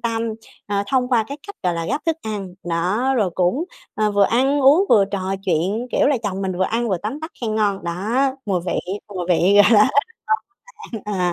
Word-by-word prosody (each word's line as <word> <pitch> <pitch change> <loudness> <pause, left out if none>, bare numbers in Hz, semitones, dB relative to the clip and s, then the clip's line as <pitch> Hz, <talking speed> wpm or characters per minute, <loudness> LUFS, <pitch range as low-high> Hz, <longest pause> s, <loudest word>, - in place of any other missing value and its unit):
tâm, 230 -1 -1 0.4
ờ, 200 -1 0
thông 250 0 +1
qua 235 -4 +2
cái 280 - -6
cách, 405 - -9
gọi 180 -2 +1
là, 165 0 -3
gắp 295 - -2
thức 325 -1 +1
ăn. 200 -4 -5 0.2
Đó, 200 +11 +1
rồi 205 -6 +1
cũng, 185 - +1 0.3
ờ, 215 0 +1
vừa 200 -1 +4
ăn 270 +6 +2
uống 290 +9 +6
vừa 200 - +6
trò 190 -1 -2
chuyện, 190 +7 0
kiểu - - +3
là, 285 -1 +3
chồng 195 -2 -3
mình 190 -1 -1
vừa 190 - +2
ăn 235 +4 -1
vừa 190 - +1
tấm 245 +9 -4
tắc 315 - -6
khen 220 -3 -2
ngon. 205 -4 0
Đó, 170 - -2 0.5
mùi 185 -3 0
vị, 175 - -1 0.3
mùi 185 -3 -5
vị, 180 +2 +3
gọi 230 - +4
là, 210 +4 +6 0.8
rất 440 -7 -13
ngon 225 - -6
bạn 210 - -2
à. 180 -1 +1
210 Hz, 230 wpm, -21 LUFS, 185-250 Hz, 0.8 s, uống